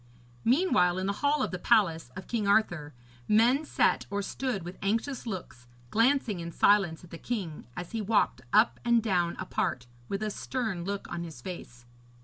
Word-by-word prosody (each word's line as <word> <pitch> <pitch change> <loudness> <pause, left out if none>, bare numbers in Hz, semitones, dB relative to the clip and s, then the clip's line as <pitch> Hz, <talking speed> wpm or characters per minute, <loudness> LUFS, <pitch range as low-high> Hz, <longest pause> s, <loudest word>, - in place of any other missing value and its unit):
Meanwhile, 235 - +3
in 185 - -1
the 200 - 0
hall 285 -1 +2
of - - -2
the 180 - -4
palace 175 - +2
of 185 - -7
King 220 -4 -1
Arthur, 175 - +1 0.3
men 240 +8 +4
sat - - +1
or 200 0 -2
stood 240 -3 -3
with 175 +2 -8
anxious 230 +6 -1
looks, 165 - -7 0.2
glancing 230 -4 +2
in 170 0 -5
silence 190 -4 +3
at 175 - -15
the 165 - -8
king, 190 - -4
as 175 -1 -6
he 225 - -2
walked 210 - +1
up 220 +2 +4
and 235 -2 +3
down 175 -5 +1
apart, 185 -8 -2 0.2
with 200 +2 -2
a 215 - -1
stern 220 -7 -3
look 200 +1 -4
on 170 -1 -3
his 160 -7 -9
face. 120 -6 -9
200 Hz, 180 wpm, -29 LUFS, 175-230 Hz, 0.3 s, men